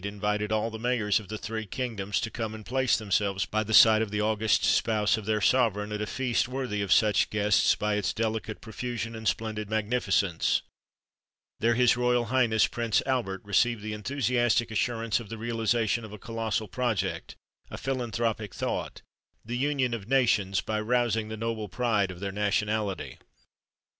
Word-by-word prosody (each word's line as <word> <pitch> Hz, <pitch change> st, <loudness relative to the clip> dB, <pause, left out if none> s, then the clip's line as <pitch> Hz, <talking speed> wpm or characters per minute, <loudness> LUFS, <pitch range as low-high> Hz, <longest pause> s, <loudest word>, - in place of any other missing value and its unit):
invited 105 Hz, +1 st, -2 dB
all 110 Hz, +1 st, 0 dB
the 110 Hz, -, -7 dB
mayors 115 Hz, -4 st, +1 dB
of 105 Hz, -, -12 dB
the 110 Hz, +2 st, -5 dB
three 110 Hz, +1 st, -4 dB
kingdoms 105 Hz, -4 st, -2 dB
to 115 Hz, -, -3 dB
come 110 Hz, -2 st, -4 dB
and 110 Hz, -1 st, -10 dB
place 130 Hz, 0 st, +2 dB
themselves 100 Hz, -2 st, 0 dB
by 110 Hz, -, -1 dB
the 110 Hz, +1 st, -4 dB
side 110 Hz, 0 st, +8 dB
of 110 Hz, -, -1 dB
the 105 Hz, +1 st, -2 dB
august 110 Hz, -1 st, +1 dB
spouse 105 Hz, -1 st, +2 dB
of 110 Hz, -2 st, -6 dB
their 110 Hz, 0 st, +1 dB
sovereign, 105 Hz, -1 st, +2 dB
at 105 Hz, 0 st, -3 dB
a 105 Hz, -, -2 dB
feast 125 Hz, -1 st, 0 dB
worthy 125 Hz, -6 st, -3 dB
of 100 Hz, -3 st, -3 dB
such 105 Hz, 0 st, +4 dB
guests 105 Hz, -1 st, +3 dB
by 105 Hz, 0 st, -1 dB
its 105 Hz, -1 st, 0 dB
delicate 110 Hz, -1 st, -3 dB
profusion 115 Hz, 0 st, -5 dB
and 110 Hz, 0 st, -5 dB
splendid 105 Hz, 0 st, -2 dB
magnificence. 105 Hz, -5 st, +1 dB, 1.0 s
There 115 Hz, +1 st, +2 dB
his 125 Hz, 0 st, +4 dB
Royal 125 Hz, 0 st, +1 dB
Highness 115 Hz, -3 st, +3 dB
Prince 115 Hz, -3 st, 0 dB
Albert 120 Hz, -8 st, -1 dB
received 105 Hz, +2 st, +1 dB
the 110 Hz, 0 st, -4 dB
enthusiastic 120 Hz, 0 st, 0 dB
assurance 115 Hz, 0 st, 0 dB
of 115 Hz, -4 st, -10 dB
the 115 Hz, -, -6 dB
realisation 115 Hz, 0 st, 0 dB
of 110 Hz, -, -9 dB
a 105 Hz, -, -8 dB
colossal 110 Hz, 0 st, -3 dB
project, 120 Hz, -1 st, -2 dB, 0.3 s
a -, -, -7 dB
philanthropic 115 Hz, -5 st, -2 dB
thought, -, -, -3 dB, 0.4 s
the 120 Hz, +2 st, -4 dB
union 135 Hz, -2 st, 0 dB
of 110 Hz, -4 st, -5 dB
nations, 110 Hz, -8 st, +2 dB
by 110 Hz, -1 st, -2 dB
rousing 115 Hz, -1 st, 0 dB
the 110 Hz, -, -5 dB
noble 110 Hz, -2 st, -3 dB
pride 105 Hz, -3 st, +1 dB
of 90 Hz, -1 st, -8 dB
their 100 Hz, 0 st, -3 dB
nationality! 105 Hz, 0 st, -1 dB
110 Hz, 175 wpm, -28 LUFS, 105-120 Hz, 1.0 s, side